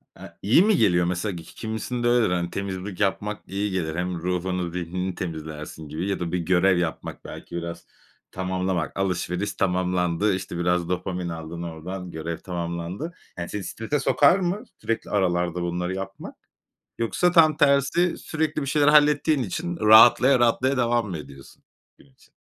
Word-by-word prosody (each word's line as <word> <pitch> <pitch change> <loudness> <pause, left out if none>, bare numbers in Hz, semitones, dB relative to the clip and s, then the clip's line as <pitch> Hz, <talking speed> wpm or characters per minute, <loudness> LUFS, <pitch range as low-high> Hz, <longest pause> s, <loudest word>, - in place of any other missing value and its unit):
aaa, - - -10
iyi 115 - +5
mi 210 -2 +3
geliyor 85 - +3
mesela? 90 +2 -2
Ki 85 - -8
ki - - -16
kimisinde 120 +2 -3
öyledir, 120 -3 +3
hani, 85 -1 -1
temizlik 95 0 -5
yapmak 105 +1 -1
iyi 100 +1 -2
gelir, 80 -4 -2
hem 90 +1 -2
ruhunu, 90 0 -2
zihnini 90 +1 -3
temizlersin 80 -2 -6
gibi 80 +6 -3
ya 100 - -1
da 85 -1 -3
bir 90 - 0
görev 90 +2 +3
yapmak 85 -2 -4
belki - - -9
biraz 85 0 -5 0.5
tamamlamak, 95 -3 -2
alışveriş 90 +1 -1
tamamlandı, 90 0 +1
işte, 95 -2 -4
biraz 90 0 0
dopamin 90 -1 -2
aldın 80 +1 -6
oradan, 85 +2 -6
görev 80 +1 -4
tamamlandı. 85 - -5 0.2
Yani, 85 - -4
seni 105 -1 -4
strese 115 +10 -3
sokar 145 +7 +4
mı 190 +4 -1 0.2
sürekli 115 0 -2
aralarda 90 -3 0
bunları 90 +1 -2
yapmak? 95 0 -7 0.6
Yoksa 175 +10 +1
tam 155 -3 +6
tersi, 145 +4 +3
sürekli 155 -1 -2
bir - - -4
şeyler 145 +1 +3
hallettiğin 150 -1 +4
için 170 - -3
rahatlaya 120 +3 +7
rahatlaya 125 +3 +2
devam 120 -3 +1
mı 85 - -4
ediyorsun 70 -2 -13 0.4
gün - - -20
için - - -25
95 Hz, 160 wpm, -24 LUFS, 85-120 Hz, 0.6 s, rahatlaya